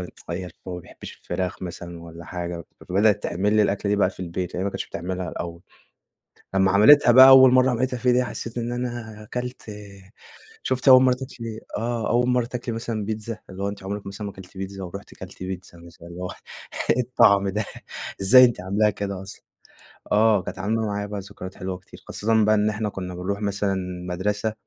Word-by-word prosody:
اتغيّر 90 Hz, 0 st, -7 dB, 0.2 s
هو 90 Hz, -, -4 dB
ما 90 Hz, -, -6 dB
بيحبش -, -, -12 dB
الفراخ 90 Hz, 0 st, -3 dB
مثلًا 85 Hz, -1 st, -7 dB
والّا 85 Hz, 0 st, -10 dB
حاجة، 85 Hz, -1 st, -5 dB, 0.2 s
فبدأت 105 Hz, +2 st, +3 dB
تعمل 100 Hz, +5 st, 0 dB
لي 105 Hz, -, +5 dB
الأكلة 100 Hz, 0 st, 0 dB
دي 105 Hz, -, +2 dB
بقى 100 Hz, -2 st, +3 dB
في -, -, -13 dB
البيت، 90 Hz, 0 st, -4 dB
يعني 90 Hz, -, -2 dB
هي -, -, -1 dB
ما 100 Hz, -, -1 dB
كانتش -, -, -5 dB
بتعملها 90 Hz, +1 st, -4 dB
الأول. 85 Hz, +1 st, -6 dB, 0.9 s
لمّا 95 Hz, 0 st, +3 dB
عملتها 120 Hz, +7 st, +7 dB
بقى 130 Hz, +2 st, +10 dB
أول 130 Hz, -1 st, +9 dB
مرة 130 Hz, 0 st, +5 dB
عملتها 125 Hz, +1 st, -1 dB
فيها 125 Hz, +1 st, +2 dB
دي 125 Hz, +1 st, +3 dB
حسيت 120 Hz, -1 st, -6 dB
إن 120 Hz, 0 st, -2 dB
أنا 120 Hz, -3 st, -5 dB
كلت 125 Hz, 0 st, -4 dB, 1.0 s
شُفتِ 130 Hz, +1 st, -2 dB
أول 130 Hz, -1 st, +9 dB
مرة 130 Hz, -1 st, +4 dB
تاكلي 125 Hz, -4 st, -7 dB, 0.2 s
آه، 115 Hz, -1 st, -2 dB
أول 120 Hz, +2 st, +2 dB
مرة 125 Hz, -1 st, +2 dB
تاكلي 120 Hz, -1 st, -5 dB
مثلًا 115 Hz, -2 st, -3 dB
بيتزا، 110 Hz, +1 st, -4 dB
اللي 95 Hz, +1 st, -6 dB
هو 100 Hz, -, 0 dB
أنتِ 100 Hz, -1 st, -8 dB
عمرك 100 Hz, +1 st, -5 dB
مثلًا 100 Hz, +1 st, -6 dB
ما 100 Hz, -, -7 dB
كلتِ 95 Hz, 0 st, -13 dB
بيتزا، 95 Hz, 0 st, -6 dB
ورُحْتِ 100 Hz, +3 st, -9 dB
كلتِ 95 Hz, 0 st, -10 dB
بيتزا 90 Hz, -1 st, -7 dB
مثلًا 85 Hz, 0 st, -14 dB
اللي 85 Hz, +1 st, -9 dB
هو 90 Hz, -, -4 dB, 0.6 s
إيه 125 Hz, -, +4 dB
الطعم 115 Hz, -5 st, +4 dB
ده؟ 105 Hz, +3 st, -1 dB, 0.6 s
إزاي 125 Hz, +6 st, +8 dB
أنتِ 120 Hz, -6 st, -1 dB
عاملاها 100 Hz, +3 st, +2 dB
كده 100 Hz, -2 st, -4 dB
أصلًا؟ 95 Hz, +1 st, -11 dB, 0.7 s
آه، 105 Hz, -1 st, +4 dB
كانت 95 Hz, -, -7 dB
عاملة 110 Hz, +3 st, 0 dB
معايا 105 Hz, 0 st, -2 dB
بقي 105 Hz, 0 st, -5 dB
ذكريات 95 Hz, -1 st, -9 dB
حلوة 95 Hz, -1 st, -4 dB
كتير، 95 Hz, -, -16 dB
خاصةً 110 Hz, 0 st, +1 dB
بقى 110 Hz, 0 st, +4 dB
إن 105 Hz, 0 st, +2 dB
إحنا 105 Hz, 0 st, -2 dB
كنا 90 Hz, -2 st, -6 dB
بنروح 100 Hz, +4 st, -3 dB
مثلًا 100 Hz, -1 st, 0 dB
المدرسة 95 Hz, +3 st, -3 dB
100 Hz, 200 wpm, -24 LUFS, 95-115 Hz, 1.0 s, بقى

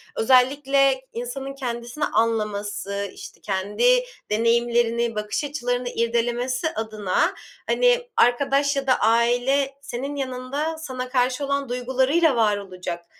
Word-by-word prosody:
özellikle 270 Hz, +2 st, +3 dB
insanın 265 Hz, +3 st, -5 dB
kendisini 240 Hz, +2 st, -3 dB
anlaması, 205 Hz, -3 st, -1 dB
işte, -, -, -11 dB
kendi 210 Hz, -, +2 dB, 0.3 s
deneyimlerini, 235 Hz, +1 st, +1 dB
bakış 210 Hz, +6 st, -2 dB
açılarını 245 Hz, -4 st, -2 dB
irdelemesi 240 Hz, +5 st, 0 dB
adına, 220 Hz, -, 0 dB, 0.3 s
hani, -, -, +2 dB
arkadaş 280 Hz, -, +3 dB
ya 275 Hz, -1 st, -2 dB
da 255 Hz, -, +5 dB
aile 245 Hz, +5 st, +2 dB
senin 275 Hz, +1 st, -5 dB
yanında 275 Hz, +4 st, -3 dB
sana 255 Hz, -5 st, -5 dB
karşı 255 Hz, +2 st, +1 dB
olan 280 Hz, -1 st, -1 dB
duygularıyla 260 Hz, +5 st, +2 dB
var 215 Hz, -3 st, +3 dB
olacak, 180 Hz, -3 st, -6 dB
250 Hz, 110 wpm, -23 LUFS, 230-275 Hz, 0.3 s, da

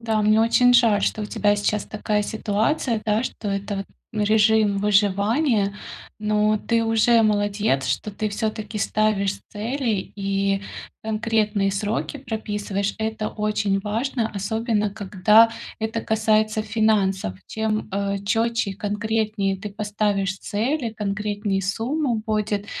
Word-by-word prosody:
Да, 220 Hz, -2 st, 0 dB
мне 215 Hz, +1 st, +4 dB
очень 245 Hz, +2 st, +4 dB
жаль, 230 Hz, -5 st, +4 dB
что 215 Hz, -, 0 dB
у 210 Hz, -, -3 dB
тебя 205 Hz, -1 st, +2 dB
сейчас 205 Hz, 0 st, 0 dB
такая 210 Hz, 0 st, -1 dB
ситуация, 220 Hz, +3 st, -1 dB
да, 215 Hz, +1 st, +1 dB
что 220 Hz, -4 st, -5 dB
это 200 Hz, +1 st, -2 dB
вот, 195 Hz, -, -4 dB, 0.3 s
ну, 210 Hz, -1 st, 0 dB
режим 215 Hz, -1 st, +3 dB
выживания, 205 Hz, +2 st, +2 dB, 0.4 s
но 215 Hz, 0 st, +2 dB
ты 230 Hz, +1 st, +1 dB
уже 225 Hz, +1 st, +4 dB
молодец, 205 Hz, -9 st, +1 dB
что 130 Hz, +11 st, -2 dB
ты 215 Hz, +1 st, -2 dB
всё-таки 215 Hz, 0 st, -3 dB
ставишь 205 Hz, -1 st, +1 dB
цели 225 Hz, -1 st, -2 dB
и 195 Hz, 0 st, 0 dB, 0.4 s
конкретные 215 Hz, -2 st, 0 dB
сроки 210 Hz, +8 st, -2 dB
прописываешь. 210 Hz, -4 st, -3 dB
Это 220 Hz, -1 st, -2 dB
очень 210 Hz, -2 st, 0 dB
важно, 225 Hz, +3 st, -2 dB
особенно 210 Hz, +1 st, -1 dB
когда 210 Hz, +2 st, +4 dB, 0.3 s
это 220 Hz, +1 st, -2 dB
касается 215 Hz, 0 st, +1 dB
финансов. 205 Hz, -, +1 dB
Чем, 220 Hz, -1 st, -2 dB
э, 200 Hz, 0 st, -1 dB
четче 225 Hz, 0 st, +1 dB
и -, -, -6 dB
конкретнее 210 Hz, -1 st, -1 dB
ты 205 Hz, +2 st, -7 dB
поставишь 205 Hz, -2 st, -1 dB
цели, 235 Hz, +5 st, -1 dB
конкретней 205 Hz, -1 st, -2 dB
сумма 240 Hz, +7 st, -1 dB
будет 210 Hz, -1 st, -1 dB
210 Hz, 130 wpm, -23 LUFS, 200-220 Hz, 0.4 s, мне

